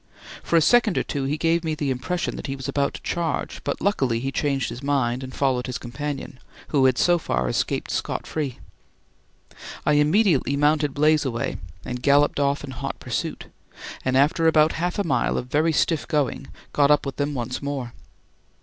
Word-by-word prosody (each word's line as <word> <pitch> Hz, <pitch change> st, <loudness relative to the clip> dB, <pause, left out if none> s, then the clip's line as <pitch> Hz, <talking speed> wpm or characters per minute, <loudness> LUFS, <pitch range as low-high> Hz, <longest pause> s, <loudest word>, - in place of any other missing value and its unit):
For -, -, -1 dB
a 165 Hz, -, +6 dB
second 235 Hz, +2 st, +4 dB
or -, -, +2 dB
two 140 Hz, -2 st, -3 dB
he 145 Hz, +3 st, -1 dB
gave 165 Hz, +1 st, +1 dB
me 160 Hz, -1 st, -1 dB
the 145 Hz, -3 st, -1 dB
impression 160 Hz, +8 st, -2 dB
that -, -, -6 dB
he 135 Hz, -, -3 dB
was 135 Hz, -1 st, -6 dB
about 140 Hz, 0 st, 0 dB
to -, -, -8 dB
charge; 170 Hz, -4 st, -2 dB
but 140 Hz, -, -2 dB
luckily 135 Hz, -, +1 dB
he 135 Hz, +3 st, -3 dB
changed 135 Hz, -3 st, 0 dB
his 120 Hz, -, -7 dB
mind 135 Hz, -3 st, 0 dB
and 130 Hz, -, -7 dB
followed 130 Hz, -2 st, 0 dB
his 125 Hz, -, -3 dB
companion, 135 Hz, +1 st, -6 dB, 0.3 s
who 140 Hz, -3 st, +3 dB
had 130 Hz, -2 st, +3 dB
so 175 Hz, -1 st, +3 dB
far 65 Hz, -, -1 dB
escaped -, -, -1 dB
scot -, -, -2 dB
free. 145 Hz, -6 st, -3 dB, 1.3 s
I -, -, +3 dB
immediately 150 Hz, -, +3 dB
mounted 150 Hz, -1 st, +2 dB
"Blazeaway" 145 Hz, -5 st, +1 dB, 0.3 s
and 125 Hz, 0 st, -4 dB
galloped 145 Hz, +1 st, +3 dB
off 140 Hz, 0 st, +1 dB
in 140 Hz, -, -6 dB
hot 125 Hz, -, -5 dB
pursuit, -, -, -4 dB, 0.6 s
and 130 Hz, 0 st, +1 dB
after 155 Hz, +4 st, +3 dB
about 155 Hz, -1 st, +5 dB
half 175 Hz, +2 st, -2 dB
a 205 Hz, -, +1 dB
mile 135 Hz, -9 st, +1 dB
of 125 Hz, -, -5 dB
very 155 Hz, +3 st, +3 dB
stiff 160 Hz, 0 st, +1 dB
going 140 Hz, -2 st, -1 dB, 0.3 s
got 145 Hz, -1 st, +4 dB
up 150 Hz, -1 st, +4 dB
with 140 Hz, -, -5 dB
them 145 Hz, 0 st, -1 dB
once 125 Hz, 0 st, -3 dB
more. 140 Hz, -4 st, -4 dB
145 Hz, 190 wpm, -24 LUFS, 130-155 Hz, 1.3 s, a